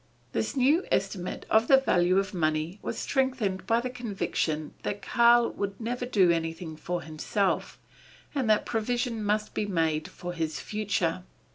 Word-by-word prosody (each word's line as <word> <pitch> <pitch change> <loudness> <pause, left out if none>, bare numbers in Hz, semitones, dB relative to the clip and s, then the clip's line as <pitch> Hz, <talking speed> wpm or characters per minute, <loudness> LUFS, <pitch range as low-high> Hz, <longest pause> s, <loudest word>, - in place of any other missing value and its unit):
This - - -2
new 285 +7 +4
estimate 190 -2 -1
of 220 +1 +4
the 270 - +8
value 180 -8 +3
of 195 +1 0
money 155 +2 -1
was - - -4
strengthened 250 -9 -1
by 230 +1 +3
the 255 +1 -3
conviction 195 -10 -2
that 205 - -4
Karl 235 0 +5
would 200 -1 -4
never 245 +2 -3
do 190 -7 +4
anything 165 0 -3
for 175 +2 -4
himself, 160 +5 -1 0.6
and 265 -6 0
that 215 - +3
provision 235 0 -1
must 210 +1 0
be 210 - -1
made 160 -5 0
for 175 0 -7
his 160 -2 -2
future. 200 -5 -1
200 Hz, 155 wpm, -28 LUFS, 175-235 Hz, 0.6 s, the